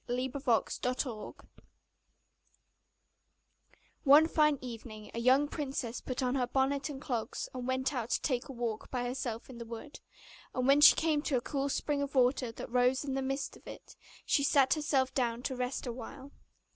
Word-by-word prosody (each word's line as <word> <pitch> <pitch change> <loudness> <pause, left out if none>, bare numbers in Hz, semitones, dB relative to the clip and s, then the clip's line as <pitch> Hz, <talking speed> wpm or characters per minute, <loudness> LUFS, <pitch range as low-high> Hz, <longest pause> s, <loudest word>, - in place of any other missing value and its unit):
THE 250 +2 -1
FROG 235 -5 +2
PRINCE 250 -3 -3 2.7
One 295 +3 +7
fine 300 -3 +3
evening 225 -3 -9
a 230 - -3
young 260 +4 +4
princess 270 -5 -4
put 255 +1 -3
on 250 0 +1
her 255 -2 0
bonnet 270 +2 0
and 280 -2 -6
clogs, 240 -4 -3
and 250 -1 -5
went 260 +2 0
out 240 -3 -3
to - - +1
take 255 -2 -1
a - - -4
walk 235 -4 -4
by 250 -2 -2
herself 245 -2 -4
in 240 -3 -10
a - - -6
wood; 230 +6 -9 0.6
and 255 - 0
when 280 +1 +5
she 295 - +10
came 315 -2 +1
to 285 -3 0
a - - -1
cool 280 +2 -2
spring 285 +1 -1
of 280 0 -4
water, 250 -1 +3
that 230 - -8
rose 250 +2 +2
in 270 - -2
the 270 - -1
midst 270 +1 -3
of - - -18
it, - - -11 0.3
she 280 - +2
sat 275 -1 +4
herself 280 -4 0
down 240 -2 -1
to 260 - -2
rest 250 +2 -3
a 240 - -3
while. 265 +3 -9
260 Hz, 185 wpm, -32 LUFS, 245-280 Hz, 2.7 s, she